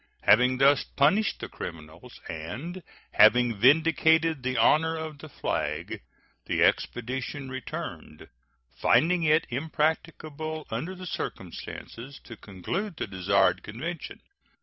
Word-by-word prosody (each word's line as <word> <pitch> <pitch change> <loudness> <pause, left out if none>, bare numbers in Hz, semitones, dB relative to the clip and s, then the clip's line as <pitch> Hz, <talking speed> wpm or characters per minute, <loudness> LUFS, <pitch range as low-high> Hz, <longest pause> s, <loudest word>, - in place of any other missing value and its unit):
Having 125 +3 +5
thus 140 +2 +4
punished 190 +10 +1
the - - -4
criminals, 80 -2 -10
and 130 - -6 0.3
having 120 -1 +5
vindicated 160 +3 +4
the 130 0 -2
honor 160 +1 +3
of 155 -2 -6
the 155 - -10
flag, - - -3 0.5
the - - +1
expedition 130 +3 -1
returned, 130 -11 -7 0.5
finding 160 - +3
it 155 0 +3
impracticable 155 +2 -2
under 155 +12 -4
the 185 0 -9
circumstances 135 -5 -7
to 115 - -10
conclude 135 - -5
the - - -2
desired 95 -2 +1
convention. 150 +10 -6
145 Hz, 110 wpm, -27 LUFS, 120-160 Hz, 0.5 s, Having